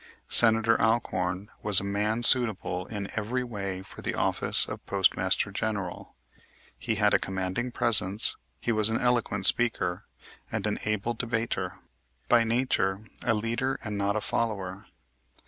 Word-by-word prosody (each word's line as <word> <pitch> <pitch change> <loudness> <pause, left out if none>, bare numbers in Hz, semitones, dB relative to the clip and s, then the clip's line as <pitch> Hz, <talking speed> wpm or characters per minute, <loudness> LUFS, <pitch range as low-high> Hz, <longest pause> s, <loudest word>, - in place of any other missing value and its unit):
Senator 115 0 +5
Alcorn 95 -4 0
was 105 -3 +4
a - - -6
man 105 +4 -1
suitable 105 -8 +3
in 100 -3 -5
every 120 +4 -2
way 100 -5 -5
for - - -12
the - - -3
office - - +1
of - - -7
Postmaster 95 0 +1
General. 100 -3 -4 0.6
He 90 +12 -2
had 105 -1 +2
a - - +4
commanding 95 +6 -3
presence, 105 -4 +3 0.2
he 120 - -1
was 110 -1 +2
an 110 - 0
eloquent 120 -5 0
speaker, 105 -6 +1 0.5
and 110 -3 -2
an 105 - -1
able 105 +2 -1
debater, 115 0 -2 0.5
by 120 -1 +5
nature 115 -4 0 0.2
a 115 - +2
leader 115 +5 -2
and 105 -3 -4
not 100 +1 0
a 110 - -1
follower. 100 -4 -3
105 Hz, 145 wpm, -27 LUFS, 95-115 Hz, 0.6 s, Senator